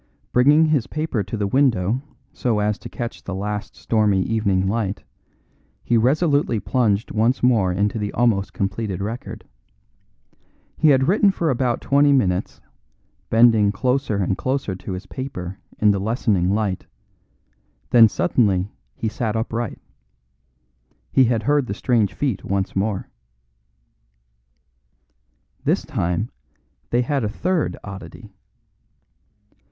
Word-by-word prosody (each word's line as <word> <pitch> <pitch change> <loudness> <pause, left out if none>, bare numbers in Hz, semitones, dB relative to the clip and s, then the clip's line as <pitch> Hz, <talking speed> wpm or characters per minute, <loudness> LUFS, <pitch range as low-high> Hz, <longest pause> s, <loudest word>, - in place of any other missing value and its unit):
Bringing 145 +6 +5
his 150 -6 +1
paper 155 -7 -2
to 100 +3 -5
the 105 - -1
window 120 -1 +2 0.3
so 120 -4 0
as 105 +1 0
to - - -9
catch 120 -1 -6
the 95 - -5
last 105 +2 -4
stormy 105 -4 +1
evening 100 -4 0
light, 105 -1 -2 0.8
he 120 - +1
resolutely 140 0 +2
plunged 105 +1 0
once 115 +5 +1
more 110 -7 +3
into 100 +4 0
the 105 -1 -3
almost 110 -5 +1
completed 100 -1 -3
record. 110 +5 -6 1.3
He 155 - +3
had 135 -1 +4
written 200 +3 +4
for 170 -5 0
about 125 -1 0
twenty 140 +1 +3
minutes, 95 -9 0 0.7
bending 115 -3 +5
closer 125 +2 0
and 95 -1 0
closer 130 -5 -2
to 95 +1 -7
his 90 +2 -6
paper 95 -8 -6 0.2
in 105 -1 +4
the 100 - 0
lessening 100 -3 0
light; 100 -2 -1 1.0
then 115 -2 +8
suddenly 95 +1 +1 0.2
he 115 - -3
sat 110 0 -2
upright. 115 0 -3 1.3
He 130 - +5
had 115 -2 0
heard 145 +1 +2
the 100 - -3
strange 115 -3 +1
feet 130 -9 -2
once 95 -1 -2
more. 100 0 -1 2.6
This - - +1
time 90 +7 -2 0.6
they 120 +1 +2
had 135 0 -1
a 105 - 0
third 175 - -1
oddity. 100 +2 -10
110 Hz, 125 wpm, -22 LUFS, 100-125 Hz, 2.6 s, then